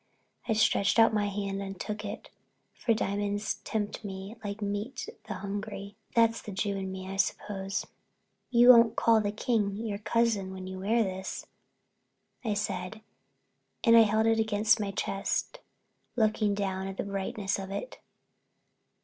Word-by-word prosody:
I 225 Hz, -, +2 dB
stretched 215 Hz, -1 st, +3 dB
out 225 Hz, -1 st, +6 dB
my 210 Hz, -1 st, +1 dB
hand 200 Hz, -1 st, -3 dB
and 195 Hz, -1 st, -6 dB
took 210 Hz, 0 st, -4 dB
it, 205 Hz, -, -7 dB, 0.4 s
for 235 Hz, -, -1 dB
diamonds 205 Hz, 0 st, -1 dB
tempt 210 Hz, -1 st, -3 dB
me 195 Hz, +1 st, -6 dB
like 205 Hz, 0 st, -4 dB
meat 205 Hz, +5 st, -3 dB, 0.2 s
the 210 Hz, -, -4 dB
hungry—that's 205 Hz, +3 st, -1 dB
the 210 Hz, -, -8 dB
Jew 200 Hz, +1 st, -1 dB
in 190 Hz, -1 st, -4 dB
me, 190 Hz, 0 st, -6 dB
I 195 Hz, 0 st, -5 dB
suppose. 195 Hz, 0 st, -1 dB, 0.6 s
"You 240 Hz, 0 st, +6 dB
won't 230 Hz, -2 st, +8 dB
call 225 Hz, -1 st, +4 dB
the 205 Hz, -1 st, -1 dB
King 210 Hz, -2 st, 0 dB
your 210 Hz, -1 st, -4 dB
cousin 220 Hz, -3 st, +1 dB
when 185 Hz, -1 st, -7 dB
you 185 Hz, 0 st, -6 dB
wear 225 Hz, +4 st, +2 dB
this," 190 Hz, -1 st, -5 dB, 1.0 s
I 215 Hz, -3 st, 0 dB
said, 205 Hz, 0 st, -3 dB, 0.8 s
and 230 Hz, -2 st, +6 dB
I 230 Hz, -, +10 dB
held 220 Hz, 0 st, +3 dB
it 225 Hz, 0 st, +3 dB
against 220 Hz, +1 st, +3 dB
my 205 Hz, -2 st, -1 dB
chest, 195 Hz, -, -2 dB, 0.6 s
looking 215 Hz, -3 st, +2 dB
down 190 Hz, -1 st, -2 dB
at 195 Hz, 0 st, -6 dB
the -, -, -1 dB
brightness 200 Hz, 0 st, -2 dB
of 190 Hz, 0 st, -6 dB
it. 200 Hz, -, -5 dB
205 Hz, 155 wpm, -29 LUFS, 195-220 Hz, 1.0 s, I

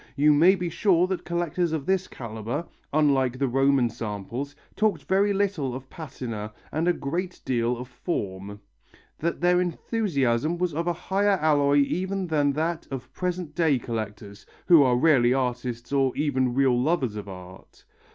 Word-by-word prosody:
You 150 Hz, +1 st, +5 dB
may 170 Hz, +6 st, +6 dB
be 180 Hz, -2 st, -3 dB
sure 175 Hz, +1 st, +2 dB
that 185 Hz, -1 st, -4 dB
collectors 170 Hz, -1 st, -1 dB
of 150 Hz, -4 st, -2 dB
this 190 Hz, -1 st, +1 dB
calibre, 115 Hz, +6 st, -5 dB, 0.3 s
unlike 135 Hz, -4 st, +2 dB
the 135 Hz, +1 st, +1 dB
Roman 135 Hz, 0 st, +3 dB
samples, 115 Hz, +5 st, -5 dB, 0.2 s
talked 210 Hz, -8 st, +1 dB
very 200 Hz, +2 st, +2 dB
little 195 Hz, -10 st, -1 dB
of 130 Hz, 0 st, -9 dB
patina 120 Hz, -9 st, -6 dB, 0.2 s
and 160 Hz, +3 st, -1 dB
a -, -, +5 dB
great 175 Hz, +5 st, -4 dB
deal 120 Hz, -1 st, 0 dB
of 125 Hz, +1 st, -7 dB
form, 100 Hz, -, -5 dB, 0.6 s
that 170 Hz, +2 st, -2 dB
their 180 Hz, 0 st, +4 dB
enthusiasm 165 Hz, -, 0 dB
was 180 Hz, -2 st, -1 dB
of 165 Hz, +3 st, -2 dB
a 175 Hz, -, +2 dB
higher 195 Hz, +3 st, +1 dB
alloy 145 Hz, -2 st, +3 dB
even 190 Hz, +6 st, -1 dB
than 145 Hz, -4 st, +1 dB
that 160 Hz, +3 st, -2 dB
of 130 Hz, -1 st, -7 dB
present 180 Hz, -4 st, -3 dB
day 160 Hz, -5 st, +2 dB
collectors, 105 Hz, -3 st, -6 dB, 0.2 s
who 170 Hz, -4 st, +7 dB
are 125 Hz, -3 st, +4 dB
rarely 130 Hz, -4 st, +4 dB
artists 125 Hz, -1 st, -3 dB
or 135 Hz, -2 st, +1 dB
even 130 Hz, -4 st, 0 dB
real 130 Hz, -3 st, +3 dB
lovers 130 Hz, -6 st, 0 dB
of 105 Hz, -1 st, -6 dB
art. 90 Hz, 0 st, -12 dB
140 Hz, 160 wpm, -25 LUFS, 125-175 Hz, 0.6 s, who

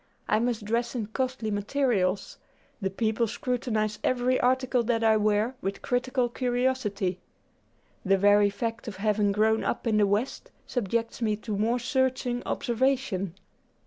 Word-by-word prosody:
I 215 Hz, -, +3 dB
must 235 Hz, -2 st, -1 dB
dress 235 Hz, +3 st, -1 dB
in 230 Hz, -4 st, -1 dB
costly 250 Hz, 0 st, -2 dB
materials. 205 Hz, -3 st, 0 dB, 0.4 s
The 195 Hz, -, 0 dB
people 220 Hz, +3 st, 0 dB
scrutinize 220 Hz, -2 st, -2 dB
every 255 Hz, 0 st, +2 dB
article 255 Hz, 0 st, +2 dB
that 230 Hz, -1 st, +1 dB
I 220 Hz, -1 st, +5 dB
wear 215 Hz, +3 st, +2 dB
with 195 Hz, +1 st, -4 dB
critical 250 Hz, 0 st, 0 dB
curiosity. 245 Hz, -7 st, -1 dB, 0.8 s
The 195 Hz, 0 st, +3 dB
very 205 Hz, +1 st, +5 dB
fact 230 Hz, +3 st, -4 dB
of 215 Hz, -, -5 dB
having 205 Hz, +1 st, +1 dB
grown 220 Hz, +2 st, +2 dB
up -, -, -2 dB
in 220 Hz, -2 st, +2 dB
the 205 Hz, -1 st, +4 dB
West, 220 Hz, -, -1 dB, 0.2 s
subjects 230 Hz, 0 st, -2 dB
me 215 Hz, -2 st, +1 dB
to 215 Hz, 0 st, -5 dB
more 225 Hz, +4 st, +1 dB
searching 255 Hz, -1 st, 0 dB
observation. 240 Hz, -7 st, 0 dB
225 Hz, 145 wpm, -27 LUFS, 205-245 Hz, 0.8 s, I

